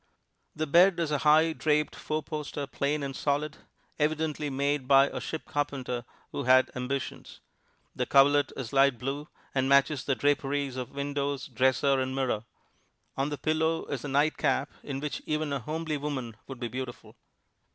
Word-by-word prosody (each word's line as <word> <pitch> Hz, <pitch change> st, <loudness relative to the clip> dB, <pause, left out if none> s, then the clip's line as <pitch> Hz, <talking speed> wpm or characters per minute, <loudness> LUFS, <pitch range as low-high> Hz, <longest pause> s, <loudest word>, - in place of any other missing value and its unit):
The 155 Hz, -, -1 dB
bed 175 Hz, +4 st, +5 dB
is 165 Hz, -3 st, 0 dB
a 145 Hz, -, +1 dB
high, 155 Hz, +2 st, +5 dB
draped 150 Hz, -1 st, +1 dB
four 155 Hz, 0 st, -3 dB
poster, 150 Hz, -1 st, -4 dB
plain 140 Hz, +2 st, -1 dB
and 135 Hz, -1 st, -4 dB
solid, 145 Hz, +2 st, -1 dB, 0.4 s
evidently 155 Hz, 0 st, 0 dB
made 140 Hz, 0 st, -1 dB
by 135 Hz, +1 st, +6 dB
a -, -, -5 dB
ship 160 Hz, -, -5 dB
carpenter 135 Hz, -5 st, -3 dB, 0.3 s
who 140 Hz, -, -4 dB
had 130 Hz, +1 st, +5 dB
ambitions. 130 Hz, +1 st, -4 dB, 0.6 s
The -, -, -1 dB
coverlet 140 Hz, 0 st, +5 dB
is 125 Hz, -3 st, -5 dB
light 135 Hz, -2 st, +4 dB
blue, 140 Hz, +4 st, -4 dB, 0.3 s
and 130 Hz, 0 st, +1 dB
matches 140 Hz, 0 st, +4 dB
the 135 Hz, -, 0 dB
draperies 140 Hz, -1 st, 0 dB
of 125 Hz, -2 st, -4 dB
windows, 140 Hz, 0 st, -2 dB
dresser 130 Hz, +2 st, +2 dB
and 130 Hz, 0 st, -2 dB
mirror. 125 Hz, -5 st, -1 dB, 0.7 s
On 135 Hz, +2 st, 0 dB
the 145 Hz, -, -4 dB
pillow 160 Hz, +3 st, 0 dB
is 140 Hz, -4 st, -3 dB
a -, -, -4 dB
nightcap, 145 Hz, 0 st, +1 dB
in 135 Hz, -1 st, -5 dB
which 150 Hz, -1 st, -3 dB
even 155 Hz, -1 st, -1 dB
a 140 Hz, -, -1 dB
homely 155 Hz, +3 st, -3 dB
woman 135 Hz, -6 st, -4 dB
would 135 Hz, -3 st, -8 dB
be 120 Hz, -, -2 dB
beautiful. 125 Hz, 0 st, -7 dB
140 Hz, 165 wpm, -29 LUFS, 135-150 Hz, 0.7 s, by